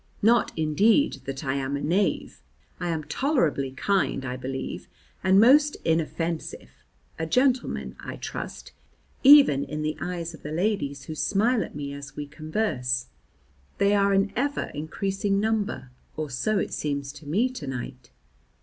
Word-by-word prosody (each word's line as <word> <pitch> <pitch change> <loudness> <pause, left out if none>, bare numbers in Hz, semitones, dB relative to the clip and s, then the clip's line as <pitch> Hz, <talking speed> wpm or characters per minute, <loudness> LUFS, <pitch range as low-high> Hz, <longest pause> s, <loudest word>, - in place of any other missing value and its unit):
Not, 235 +2 +4
indeed, 200 - +3
that 135 +2 -5
I 135 - 0
am 140 0 -2
a - - -4
knave; 180 +8 0 0.4
I 175 -1 -2
am 160 -2 -2
tolerably 155 - 0
kind, 140 -1 0
I 125 0 -3
believe, 130 +1 -5 0.4
and 190 +1 +5
most 290 +6 +6
inoffensive, 165 0 -2 0.5
a 160 - -2
gentleman, 255 +5 +1
I - - -6
trust, - - -7 0.5
even 275 - +8
in 150 0 -4
the 155 0 -1
eyes 170 -2 -4
of 160 - -12
the 150 - -6
ladies 160 -6 -1
who 155 - -6
smile 215 - +1
at - - -10
me 140 -1 -5
as 140 -1 -9
we 145 - -4
converse; 150 - -2 0.7
they 200 +1 +3
are 200 -1 +3
an 195 +1 +2
ever 285 +3 -1
increasing 195 +6 -1
number, 210 - -1 0.3
or 155 -2 -3
so 215 - 0
it - - -2
seems 140 -2 -2
to 145 +1 -13
me 205 - +2
to 250 - -7
night. 125 -1 -6
160 Hz, 155 wpm, -26 LUFS, 140-205 Hz, 0.7 s, even